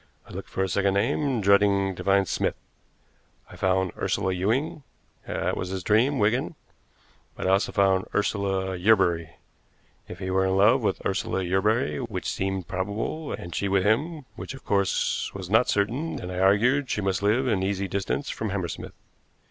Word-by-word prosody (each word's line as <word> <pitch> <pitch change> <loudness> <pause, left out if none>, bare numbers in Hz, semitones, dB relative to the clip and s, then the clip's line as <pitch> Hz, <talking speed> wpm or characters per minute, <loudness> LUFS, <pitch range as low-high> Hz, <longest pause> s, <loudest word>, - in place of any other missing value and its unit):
I - - -14
looked - - -7
for 95 - -1
a - - 0
second 100 +1 +1
name, 125 +3 +1
dreading 100 -1 +3
to - - -8
find 100 -1 +3
Smith. - - -1 1.0
I - - -11
found 95 -1 +1
Ursula 95 - -1
Ewing, 115 - -1 0.5
that - - -1
was 90 - -4
his 95 -1 -4
dream, 120 +9 +3
Wigan; 120 +9 +1 0.8
but - - -5
I 95 - +3
also 95 +1 +2
found 95 -2 +2
Ursula 95 -2 0
Yerbury. 90 -4 +2 0.7
If 90 - -8
he 95 0 -4
were 95 0 +2
in 95 0 +1
love 115 +7 +5
with 100 -4 -2
Ursula 95 0 -1
Yerbury, 95 -3 +1
which - - -4
seemed 95 -2 -2
probable, 105 - -3
and 85 -1 -6
she 100 - -1
with 95 -1 +2
him, 145 - 0
which - - -7
of 135 - -14
course 100 -2 0
was 95 -1 -7
not 110 +3 +4
certain, 120 +11 0
then 90 - -6
I 90 - -4
argued 115 +9 +3
that - - -21
she 105 - -1
must 95 -1 -1
live 110 +6 +2
in 105 -6 +1
easy 95 0 -1
distance 100 +9 -2
from 110 - -4
Hammersmith. 95 -3 -4
100 Hz, 180 wpm, -26 LUFS, 95-110 Hz, 1.0 s, love